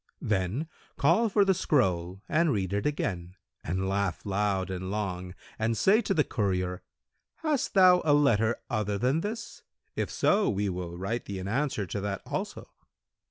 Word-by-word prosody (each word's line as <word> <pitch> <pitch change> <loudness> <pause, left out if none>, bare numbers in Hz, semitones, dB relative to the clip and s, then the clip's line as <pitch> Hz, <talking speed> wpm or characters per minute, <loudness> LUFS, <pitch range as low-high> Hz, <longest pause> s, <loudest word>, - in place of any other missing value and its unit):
Then 105 - -1 0.3
call 180 +11 +3
for 200 0 +4
the 195 - +4
scroll 95 - 0
and 165 0 +2
read 95 -4 -1
it 100 +7 0
again 90 -11 -3 0.3
and 95 +3 -2
laugh 100 -2 -1
loud 100 -1 0
and 95 0 -4
long 90 -3 -3 0.2
and 110 +1 0
say 200 - +4
to 195 - -1
the 150 - +4
courier, 90 -5 -1 0.5
'Hast 305 -8 -1
thou 180 -2 +7
a 155 - +2
letter 120 -6 +3
other 105 -1 -1
than 130 +9 +1
this? 210 +1 -5 0.3
If - - -1
so, 205 +1 +2
we 100 0 0
will 90 -2 -5
write 100 +6 -3
thee 100 - -5
an 95 0 -5
answer 125 -2 -1
to 100 +2 -4
that 100 -1 -3
also.' - - -4
105 Hz, 165 wpm, -28 LUFS, 95-150 Hz, 0.5 s, thou